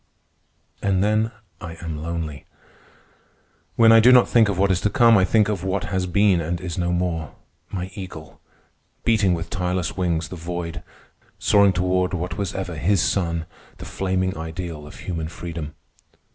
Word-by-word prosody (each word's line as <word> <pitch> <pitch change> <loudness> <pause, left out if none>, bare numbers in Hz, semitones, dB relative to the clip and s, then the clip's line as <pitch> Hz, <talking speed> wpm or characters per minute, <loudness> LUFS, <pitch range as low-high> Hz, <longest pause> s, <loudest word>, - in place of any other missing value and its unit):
And 95 -1 +1
then 110 +2 +2 0.3
I 85 -1 -7
am 80 -3 -5
lonely. 80 -2 -5 1.3
When 115 -1 +6
I 115 - +8
do 120 +3 +7
not 125 -1 +6
think 115 -3 +4
of 100 - -2
what 95 +1 +3
is 90 -1 0
to 105 - +1
come, 115 +2 +5
I 95 - +5
think 105 +1 +3
of 105 -4 -2
what 95 0 -1
has 95 -1 0
been 95 -1 +3
and 85 +2 -3
is 85 -3 -5
no 90 -1 -1
more—my 90 +1 -5
Eagle, 90 -6 -9 0.6
beating 100 -6 +3
with 85 0 -6
tireless 90 -3 -2
wings 85 -3 -1
the - - -7
void, 85 0 -5 0.6
soaring 100 -2 +4
toward 90 0 0
what 90 0 -4
was 100 -1 -3
ever 95 -4 -4
his 95 +5 +2
sun, 85 -4 0 0.3
the - - -9
flaming 95 -1 -1
ideal 80 -1 -6
of - - -12
human 80 -4 -4
freedom. 80 -2 -7
90 Hz, 165 wpm, -23 LUFS, 85-100 Hz, 1.3 s, I